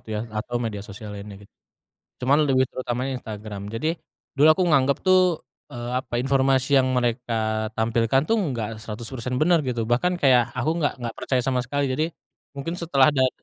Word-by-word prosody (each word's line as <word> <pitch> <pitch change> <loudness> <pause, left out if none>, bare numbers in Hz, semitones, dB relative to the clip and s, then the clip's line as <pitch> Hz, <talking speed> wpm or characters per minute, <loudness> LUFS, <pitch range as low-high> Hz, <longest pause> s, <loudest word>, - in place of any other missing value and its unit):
gitu - - -24
ya - - -2
atau 110 +3 -3
media 115 -4 -3
sosial 105 +1 -9
lainnya 100 0 -8
git - - -22 0.7
cuman 135 +3 +4
lebih 130 -1 +4
terutamanya 130 +1 -3
Instagram 105 -3 -7
jadi, 125 +9 -1 0.4
dulu 145 +3 +5
aku 170 +4 +4
nganggep 140 -4 +3
tuh, 185 0 +6 0.5
eee, 120 0 -6
apa 130 -2 -12
informasi 135 +1 +2
yang 130 - +2
mereka 120 0 -1 0.4
tampilkan 115 +3 +2
tuh 225 - +1 0.2
nggak 115 -5 -3
100% 115 +3 -5
benar 170 +1 +4
gitu 120 -2 -1
bahkan 180 +10 +2
kayak 130 -3 +6 0.2
aku 135 +5 0
gak 145 - +1
gak 115 - -3
percaya 130 -2 0
sama 130 -1 +1
sekali 140 +4 -2
jadi, 155 +4 +1 0.5
mungkin 140 +5 -3
setelah 140 -6 +4
dat 130 -2 +3
125 Hz, 175 wpm, -24 LUFS, 115-135 Hz, 0.7 s, tuh